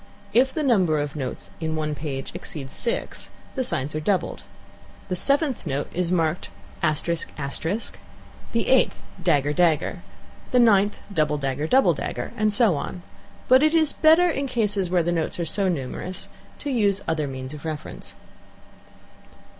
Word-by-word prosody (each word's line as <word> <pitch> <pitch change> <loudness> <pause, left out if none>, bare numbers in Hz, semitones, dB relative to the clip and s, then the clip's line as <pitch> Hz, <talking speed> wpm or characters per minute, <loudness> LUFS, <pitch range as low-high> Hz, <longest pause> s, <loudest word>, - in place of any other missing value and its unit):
If 260 +4 +4
the 310 - -2
number 190 - +3
of 145 0 -3
notes 130 -4 -5
in 160 -1 -2
one 155 -1 -1
page 140 -2 -4
exceeds 135 -4 -7
six, 235 - -3 0.2
the 260 - -1
signs 140 - -2
are 155 - -1
doubled. 185 +4 0 0.7
The 180 - 0
seventh 280 - +1
note 140 +2 -2
is 180 0 0
marked 165 -1 0 0.3
thus:; 155 -1 +1 1.5
the 230 -1 0
eighth, 260 -1 +3 0.2
[dagger 145 -4 +2
character][dagger 165 -1 +4
character]; - - -5 0.5
the 250 - +3
ninth, 205 -3 +4 0.2
[double 150 -3 +2
dagger 140 +1 -2
character][double 265 +9 +5
dagger - - -4
character]; - - -5
and 215 -1 +2
so 215 -3 +4
on. 175 +5 -5 0.4
But 260 +1 +7
it 310 +2 +4
is 315 -2 +3
better, 325 +3 +5
in 280 -5 -1
cases 205 -7 0
where 175 -1 +2
the 175 - 0
notes 165 0 -1
are 170 - 0
so 195 +3 +2
numerous, 170 +4 -3 0.3
to 290 - -4
use 200 -5 +1
other 155 -2 0
means 130 0 -6
of 150 - -9
reference. 155 -2 -6
180 Hz, 160 wpm, -24 LUFS, 150-235 Hz, 1.5 s, But